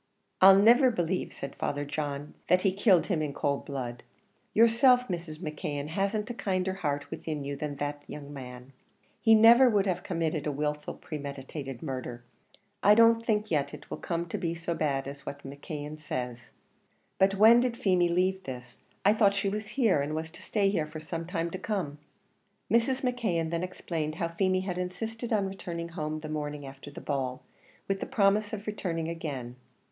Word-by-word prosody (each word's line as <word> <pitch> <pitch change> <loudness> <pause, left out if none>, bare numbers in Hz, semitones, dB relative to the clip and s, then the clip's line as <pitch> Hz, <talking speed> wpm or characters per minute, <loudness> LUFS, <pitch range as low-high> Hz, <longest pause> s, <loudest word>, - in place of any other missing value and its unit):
"I'll 190 +1 +9
never 240 +6 +6
believe," 180 -5 -1
said 140 - -7
Father 145 0 -2
John, 145 0 -4
"that 180 0 +4
he 195 - +4
killed 195 -2 +4
him 175 -6 0
in 150 -2 -2
cold 140 -1 -1
blood. 125 -4 -4 0.5
Yourself, 245 +3 +5
Mrs. 170 -3 -4
McKeon 150 -2 -4
hasn't 200 +5 -1
a - - -4
kinder 190 -4 -1
heart 145 -6 -3
within 150 -3 -4
you 140 0 -4
than 145 0 -4
that 145 +1 -3
young 145 -1 -8
man; 125 -1 -9 0.5
he 225 -1 +6
never 235 +4 +8
would 205 -3 +2
have 180 -2 0
committed 165 -3 -2
a - - +1
wilful, 150 +1 -3
premeditated 140 -2 -7
murder; 130 -4 -5 0.6
I 205 +1 +7
don't 230 0 +6
think 215 -2 0
yet 150 -1 0
it 150 - -15
will - - -4
come 170 -1 -2
to - - -3
be 170 -1 -2
so 170 0 -3
bad 140 -4 -1
as 140 +1 -8
what 140 0 -7
McKeon 145 +2 -7
says. 125 -5 -5 0.7
But 195 +1 +4
when 220 +4 +8
did 245 -1 0
Feemy 180 -5 +3
leave 185 +2 +1
this? 125 -2 -8 0.3
I 205 - +7
thought 205 -2 +4
she 200 0 0
was 210 +1 -4
here, 220 - +4
and 150 +2 -2
was 160 0 -4
to - - -14
stay 200 -2 +1
here 160 -6 0
for 155 +1 -7
some 165 +1 -5
time 170 -2 -2
to 185 - -5
come." 170 -9 -3 0.7
Mrs. 235 +4 +2
McKeon 215 -11 0
then 170 0 -1
explained 165 -4 -3
how 170 0 -2
Feemy 185 +2 +1
had 180 -1 -3
insisted 225 +6 -4
on 210 -3 +2
returning 170 -3 -5
home 155 -2 -4
the 155 - -6
morning 150 -1 -4
after 135 +1 -10
the 140 - -10
ball, 130 -3 -3 0.4
with 195 0 0
the - - -4
promise 205 0 +2
of 210 -1 -5
returning 170 -6 -3
again. 140 -7 -5
170 Hz, 185 wpm, -29 LUFS, 145-200 Hz, 0.7 s, I'll